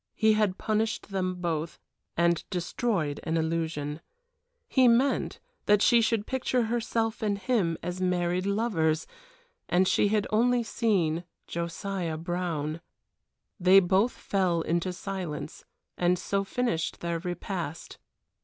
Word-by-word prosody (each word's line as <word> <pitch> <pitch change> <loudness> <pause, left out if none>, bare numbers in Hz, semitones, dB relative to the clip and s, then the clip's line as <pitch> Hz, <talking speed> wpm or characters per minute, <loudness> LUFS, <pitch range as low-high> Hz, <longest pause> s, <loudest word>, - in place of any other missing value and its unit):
He 220 0 +4
had 210 -3 +1
punished 215 0 -1
them 185 -1 -1
both, 170 -2 -3 0.4
and 170 -1 +2
destroyed 175 -4 -1
an 165 0 -1
illusion. 160 -2 -2 0.7
He 260 -2 +4
meant 250 +4 +2 0.3
that 210 0 +5
she 235 -2 +6
should 220 -2 +1
picture 255 -1 0
herself 225 -1 -1
and 205 -2 0
him 200 -7 0
as 180 +2 -4
married 180 0 0
lovers, 190 -7 +1 0.6
and 185 +1 +3
she 205 - +3
had 210 0 +1
only 240 +2 +3
seen 185 -8 0 0.2
Josiah 170 0 -3
Brown. 165 -2 -3 0.8
They 185 +2 +7
both 195 +6 +2
fell 185 -4 0
into 170 +3 0
silence 180 -5 -5 0.3
and 180 0 +3
so 195 +2 -1
finished 195 -6 -2
their 170 -1 -2
repast. 175 -2 -5
185 Hz, 125 wpm, -28 LUFS, 170-215 Hz, 0.8 s, They